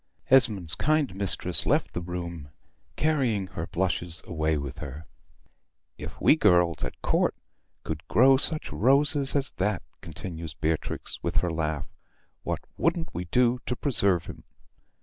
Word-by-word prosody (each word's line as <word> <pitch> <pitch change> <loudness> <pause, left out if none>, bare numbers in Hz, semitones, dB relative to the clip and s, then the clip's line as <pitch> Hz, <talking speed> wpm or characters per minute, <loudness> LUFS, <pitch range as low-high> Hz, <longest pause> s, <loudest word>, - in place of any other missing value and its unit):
Esmond's 105 -11 +3
kind 150 -7 +1
mistress 100 0 0
left - - +1
the 85 - -3
room, 85 -4 -6 0.5
carrying 130 -10 +1
her 85 -2 -6
blushes 85 -2 -2
away 80 -2 0
with 70 -2 -6
her. 75 +4 -8 0.9
"If - - -9
we - - +5
girls 90 - +3
at - - -5
Court - - +1 0.5
could 80 +1 -5
grow 135 +3 +6
such 155 +3 -1
roses 140 +3 +3
as 140 -1 0
that," 100 0 0 0.2
continues 80 -1 -7
Beatrix, 80 0 -2
with - - -3
her 90 - +1
laugh, 80 -2 -2 0.6
"what - - -3 0.2
wouldn't 165 0 0
we 90 +2 -4
do 125 +6 +2
to 125 - -1
preserve 100 - +3
'em? - - -9
90 Hz, 140 wpm, -27 LUFS, 80-130 Hz, 0.9 s, grow